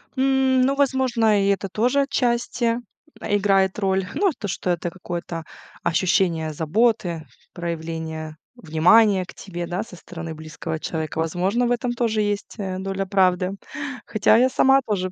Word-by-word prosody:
Ну, 265 0 +3
возможно, 250 -6 +2
и - - +1
это 195 0 0
тоже 245 +8 +2
отчасти, 240 -3 0 0.4
э, 205 - 0
играет 195 -1 +2
роль. 190 -2 +1
Ну, 395 - +3
э, - - 0
то, 205 - -5
что 185 - -3
это 175 0 0
какое-то 170 -2 -6 0.4
ощущение 165 -2 +1
заботы, 170 0 0 0.3
проявление 160 -2 -5 0.2
внимания 195 +2 +4
к - - -12
тебе, 175 -3 -6
да, 180 +4 -2
со 220 - -12
стороны 165 -2 -8
близкого 160 +1 -6
человека. 160 -1 -4
Возможно, 185 +9 0
в - - 0
этом 245 0 0
тоже 230 -3 0
есть, 205 -1 -2
э, 190 -3 -4
доля 195 0 -3
правды. 185 -1 +2 0.5
Хотя 215 +1 +3
я 255 +2 +4
сама 270 +1 +4
тоже 185 -4 -1
195 Hz, 150 wpm, -23 LUFS, 170-235 Hz, 0.5 s, внимания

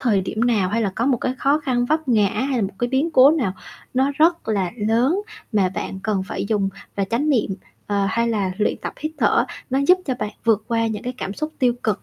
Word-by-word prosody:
thời 220 -7 +2
điểm 200 +3 -4
nào, 225 -6 +2
hay 225 +4 0
là 200 - 0
có 235 - 0
một 270 -3 +3
cái 255 +2 -2
khó 280 +2 +3
khăn 250 -4 0
vấp 310 +3 -1
ngã, 215 -5 +4
hay 260 +5 -1
là - - +1
một 195 0 -3
cái 245 - 0
biến 270 +6 +1
cố 270 -2 +7
nào 265 - 0 0.4
nó 265 +2 +2
rất 330 -3 +3
là 195 -5 0
lớn 235 - +2 0.3
mà 200 -4 +3
bạn 190 +1 -5
cần 205 -3 0
phải - - -3
dùng 205 -3 +1 0.3
và 200 - +1
chánh 235 +9 -1
niệm, 215 -8 +1 0.3
ờ, 200 -1 +1
hay 235 +4 0
là 200 -5 0
luyện 210 - +1
tập - - -4
hít 310 +1 -3
thở, - - +3 0.3
nó 265 - +2
giúp 365 +1 +7
cho 260 - 0
bạn 210 - -2
vượt 220 -2 +2
qua 230 -1 +1
những 215 -2 -3
cái 250 +1 -4
cảm 195 - -4
xúc 305 +5 -4
tiêu 250 -2 +3
cực, 215 -3 -1
230 Hz, 250 wpm, -22 LUFS, 205-265 Hz, 0.4 s, cố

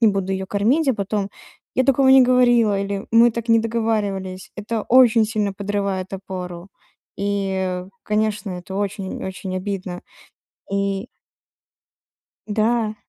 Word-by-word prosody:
не 225 - +6
буду 195 -1 -1
её 190 0 -3
кормить", 245 +11 +1
а 260 - +3
потом: 200 0 -2 0.5
"Я 260 - +2
такого 270 0 +4
не 265 -1 +8
говорила" 240 -5 +4
или 200 0 -3
"Мы 230 +1 +6
так 235 0 -5
не 230 0 +6
договаривались". 210 -5 -2
Это 215 +2 -3
очень 235 -3 +5
сильно 210 -3 -1
подрывает 200 -1 -2
опору. 185 -1 -7 0.5
И, 190 -2 -1 0.2
конечно, 210 -1 -1
это 180 +2 -7
очень, 200 -1 -3
очень 190 0 -5
обидно. 185 -2 -4 0.7
И 200 0 -1 1.4
Да. 215 +1 +1
205 Hz, 130 wpm, -21 LUFS, 190-230 Hz, 1.4 s, не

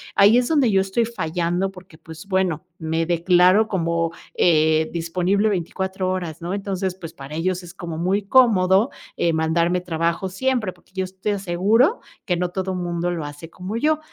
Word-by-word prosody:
ahí 205 +4 +6
es 245 -1 +2
donde 285 -7 +3
yo 195 -1 +4
estoy 195 +5 0
fallando, 180 -3 -2
porque, 180 -3 -15
pues, 160 +2 -12
bueno, 185 -3 0
me 160 0 -1
declaro 180 +4 +4
como, 170 -4 0 0.2
eh, 160 -1 +3
disponible 180 +5 0
24 190 0 -2
horas, 175 -4 -4
¿no? 175 +2 -3
Entonces, 195 -2 -2
pues, 165 -3 -9
para 140 +2 -9
ellos 180 +2 -1
es 175 +1 -11
como 170 -4 -6
muy 190 +5 0
cómodo, 200 -2 +4 0.3
eh, 170 - +2
mandarme 170 +3 +1
trabajo 170 +1 -1
siempre, 220 0 -1
porque 175 - -27
yo 190 0 -1
es 185 +1 -13
te 210 - -1
aseguro 200 - +2 0.3
que 180 - 0
no 180 0 -1
todo 190 +1 -3
mundo 175 -1 -2
lo 165 -4 -3
hace 145 +3 -9
como 185 +5 -6
yo. 305 +5 +2
180 Hz, 180 wpm, -22 LUFS, 170-195 Hz, 0.3 s, ahí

